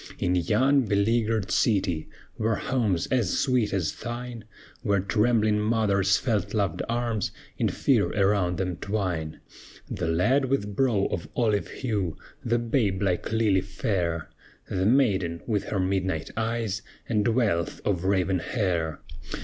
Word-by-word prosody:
In 90 - 0
yon 120 +10 +3
beleaguered 110 +1 +1
city 95 -8 +1 0.3
Were 110 0 +1
homes 105 -9 0
as 120 -8 +1
sweet 125 -6 +2
as 90 -5 0
thine; 120 -1 -6 0.4
Where 100 -1 +2
trembling 105 +1 +2
mothers 105 -3 +2
felt 105 -4 -1
loved 95 -5 0
arms 115 -3 -1 0.3
In - - +2
fear - - +2
around 95 -3 +2
them 90 -3 -2
twine, 90 -7 -3 0.5
The 85 - -2
lad 125 +12 +2
with 105 -7 -1
brow 115 -6 +2
of 85 -5 -4
olive 110 -4 +1
hue, 100 -10 -2 0.3
The 120 0 +1
babe 115 -5 0
like 90 +2 0
lily 110 -4 +3
fair, 90 - -2 0.4
The 95 +1 0
maiden 100 -10 +2
with 105 -4 -1
her 100 - -2
midnight 95 -3 -1
eyes, 110 -3 -1 0.3
And 105 -2 +1
wealth 110 -8 +1
of 95 -4 0
raven 95 -1 +1
hair. 85 - -1
100 Hz, 135 wpm, -26 LUFS, 95-115 Hz, 0.5 s, yon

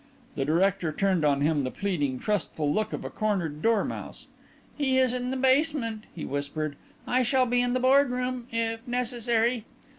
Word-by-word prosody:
The 135 - -2
director 175 +2 +2
turned 185 0 +1
on 140 -2 +2
him 150 0 +2
the 130 - -2
pleading, 145 -8 -1
trustful 155 -6 -1
look 215 0 0
of - - -5
a - - -5
cornered 175 -8 -1
dormouse. 225 -2 -1 0.5
"He 265 -3 +1
is 255 -2 +3
in 250 0 -2
the 265 - -2
basement," 260 -4 +1
he 165 - -5
whispered. 145 +1 -3 0.3
"I 255 - +2
shall 255 +1 +3
be 245 0 +2
in 245 0 0
the 255 - +1
boardroom 255 -2 +2
if 225 0 -1
necessary." 240 -1 0
225 Hz, 170 wpm, -27 LUFS, 160-250 Hz, 0.5 s, is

